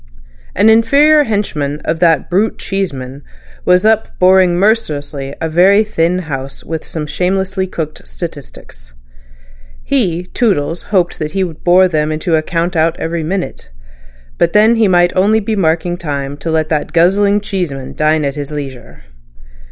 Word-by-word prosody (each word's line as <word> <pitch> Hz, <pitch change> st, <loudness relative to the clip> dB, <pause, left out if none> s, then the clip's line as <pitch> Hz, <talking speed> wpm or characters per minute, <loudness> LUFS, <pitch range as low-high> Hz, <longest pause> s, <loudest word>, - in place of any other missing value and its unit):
An 205 Hz, +4 st, +3 dB
inferior 280 Hz, +7 st, +5 dB
henchman 155 Hz, -, -2 dB
of 160 Hz, -, -1 dB
"that 165 Hz, -4 st, +2 dB
brute 200 Hz, +5 st, 0 dB
Cheeseman" 140 Hz, -9 st, -4 dB, 0.4 s
was 180 Hz, +3 st, +3 dB
up 220 Hz, 0 st, +1 dB
boring 185 Hz, -1 st, +4 dB
mercilessly 145 Hz, -9 st, -1 dB
a 160 Hz, -, -2 dB
very 190 Hz, +6 st, +4 dB
thin 180 Hz, -4 st, 0 dB
House 135 Hz, -2 st, -6 dB
with 160 Hz, -1 st, -5 dB
some 155 Hz, -2 st, -5 dB
shamelessly 190 Hz, +3 st, -1 dB
cooked 155 Hz, -, -6 dB
statistics. -, -, -9 dB, 0.9 s
He, 180 Hz, -11 st, 0 dB
Toodles, 180 Hz, -5 st, -1 dB
hoped 180 Hz, -6 st, 0 dB
he 170 Hz, +6 st, -1 dB
would 165 Hz, -4 st, -7 dB
bore 185 Hz, +1 st, +5 dB
them 155 Hz, -3 st, -1 dB
into 160 Hz, +2 st, 0 dB
a 155 Hz, -, +2 dB
count 170 Hz, +2 st, -2 dB
out 165 Hz, +1 st, +1 dB
every 165 Hz, 0 st, -3 dB
minute. 180 Hz, -, -4 dB, 0.7 s
But 170 Hz, -, +2 dB
then 220 Hz, +3 st, +5 dB
he 225 Hz, -2 st, +3 dB
might 175 Hz, -1 st, +3 dB
be -, -, -7 dB
only 215 Hz, +2 st, +1 dB
marking 175 Hz, -1 st, 0 dB
time 140 Hz, -4 st, -4 dB
to 150 Hz, +3 st, -5 dB
let 160 Hz, -1 st, 0 dB
that 155 Hz, -1 st, -2 dB
guzzling 200 Hz, +4 st, +3 dB
Cheeseman 175 Hz, -10 st, -4 dB
dine 155 Hz, 0 st, +1 dB
at 140 Hz, -, -1 dB
his 145 Hz, -1 st, -6 dB
leisure. 135 Hz, -, -8 dB
175 Hz, 150 wpm, -15 LUFS, 150-195 Hz, 0.9 s, inferior